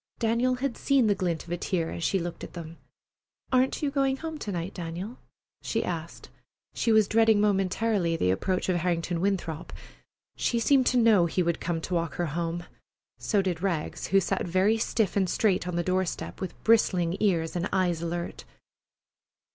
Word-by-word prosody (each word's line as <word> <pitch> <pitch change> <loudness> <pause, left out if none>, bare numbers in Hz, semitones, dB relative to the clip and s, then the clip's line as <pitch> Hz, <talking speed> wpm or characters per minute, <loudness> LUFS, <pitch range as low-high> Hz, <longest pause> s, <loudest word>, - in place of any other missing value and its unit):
Daniel 235 +2 +1
had 255 0 -3
seen 275 -4 +3
the 210 - +4
glint 175 -5 -2
of 170 - -11
a 175 - -1
tear 170 -2 -1
as 170 - -5
she 195 - +2
looked 175 -1 -5
at - - -8
them. 165 -1 -8 0.8
"Aren't 255 +3 +2
you 285 - +1
going 270 -1 +1
home 320 +1 -6
to 210 - -4
night, 175 +1 -4
Daniel?" 180 +7 -6 0.4
she - - -1
asked. - - -6 0.4
She 230 - +1
was 215 -2 +5
dreading 225 -1 +4
momentarily 195 -3 +1
the 90 - +2
approach 185 - -1
of 185 -2 +2
Harrington 170 0 -1
Winthrop. 180 -5 -2 0.6
She 235 - 0
seemed 260 +2 +3
to 255 - +3
know 220 -7 +5
he 180 +2 0
would 170 -1 0
come 170 -1 -1
to 180 - -4
walk 170 -1 -1
home 170 0 -2
with - - -13
her. - - -24 0.5
So 205 -3 +1
did 175 -3 -2
Rags, 175 -6 -2
who 195 - +4
sat 185 - -1
very 190 +6 +2
stiff 220 -2 0
and 190 -3 +2
straight 190 -3 +1
on 180 - -3
the 175 - 0
door 185 +1 +1
step, - - -6
with 190 - -5
bristling 185 -6 +3
ears 170 -6 +1
and 175 +2 -1
eyes 180 -4 +1
alert. 170 +1 -4
185 Hz, 190 wpm, -27 LUFS, 170-220 Hz, 0.8 s, was